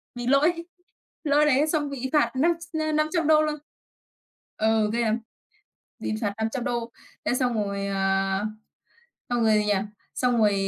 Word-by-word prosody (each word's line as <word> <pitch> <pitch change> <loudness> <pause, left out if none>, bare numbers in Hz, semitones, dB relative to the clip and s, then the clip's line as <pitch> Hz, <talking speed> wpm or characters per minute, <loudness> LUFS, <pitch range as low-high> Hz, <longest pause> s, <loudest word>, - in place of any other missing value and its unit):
bị 245 0 -4
lỗi, 325 +5 +3 0.6
lỗi 295 +1 +4
đấy 295 +1 +3
xong 300 -2 0
bị 265 -1 -4
phạt 300 - +3
năm 330 +6 +3 0.2
tr - - -2
ơ, 310 - 0
$500 310 0 +3
luôn. 305 -1 0 1.0
Ừ, 220 -1 +2
ghê 235 - +1
lắm. 225 0 +1 0.8
Bị - - -3
phạt 205 -2 -1
$500, 235 +1 -2 0.3
thế - - +1
xong 250 -2 +1
rồi, 200 -2 -2
à, 195 +1 0 0.8
xong 240 -1 +1
rồi 220 -1 +4
gì 210 0 +2
nhở, 205 -1 +1 0.3
xong 245 -2 +1
rồi 210 -2 +4
245 Hz, 155 wpm, -25 LUFS, 215-300 Hz, 1.0 s, lỗi